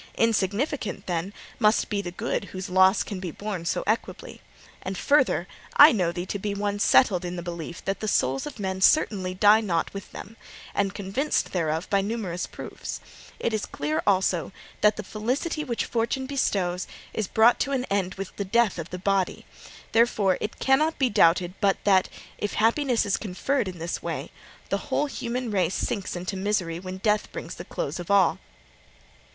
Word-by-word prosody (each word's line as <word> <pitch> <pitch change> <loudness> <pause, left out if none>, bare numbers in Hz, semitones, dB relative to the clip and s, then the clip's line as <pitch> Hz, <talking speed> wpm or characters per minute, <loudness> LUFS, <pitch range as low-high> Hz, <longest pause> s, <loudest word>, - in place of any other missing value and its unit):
Insignificant, 225 +1 0
then, 175 +2 -2 0.3
must 215 -1 +3
be 205 -1 -1
the 180 - -5
good 180 +2 -3
whose 185 -1 -7
loss 190 +2 +5
can 200 -3 -6
be 185 -1 -4
borne 195 0 -5
so - - -1
equably. 220 +2 -3 0.4
And, 190 0 -4
further, 290 +8 +2 0.3
I 295 +2 +10
know 180 -7 +1
thee 175 +1 -4
to 200 - -4
be 200 +1 -3
one 205 0 -2
settled 195 -4 +4
in 175 0 -4
the 175 - -5
belief 170 -1 -7
that 195 - -1
the 215 - -3
souls 135 -9 +1
of 295 - -8
men 190 -2 -3
certainly 190 -7 +3
die 210 +3 +6
not 175 -6 -1
with 200 -1 -8
them, 225 +3 -10 0.4
and 200 -1 0
convinced 205 +10 -1
thereof 165 -1 -1
by 200 -1 +3
numerous 195 -4 -3
proofs; - - -7 0.4
it 230 - -1
is 215 - -1
clear 155 +2 -2
also 185 -3 +2 0.3
that 210 0 +5
the 210 - -5
felicity 260 +10 -2
which 240 -6 -2
Fortune 235 +3 -1
bestows 190 -10 -1 0.3
is 215 -3 -2
brought 225 +2 +4
to 280 - 0
an 260 -2 0
end 190 -2 0
with 195 -1 -7
the 200 - -1
death 205 -1 +2
of 165 - -6
the 180 - -5
body: 195 0 0 0.5
therefore, 220 -5 +3
it 215 - -4
cannot 305 +4 +2
be 260 -3 +2
doubted 175 -1 +4
but 200 -2 +3
that, 190 -2 +4 0.3
if 205 - -2
happiness 240 +2 +2
is 200 - +1
conferred 220 +5 -1
in 185 -1 -6
this 165 +1 -4
way, - - -4 0.4
the - - +1
whole 295 - +1
human 250 -3 -3
race 185 -3 +1
sinks 200 -5 -2
into 180 +3 -4
misery 190 -4 -1
when 185 0 -6
death 210 +2 0
brings 165 - -6
the 175 - -8
close 150 0 -4
of 175 - -7
all. 195 -4 +4
200 Hz, 185 wpm, -26 LUFS, 180-225 Hz, 0.5 s, I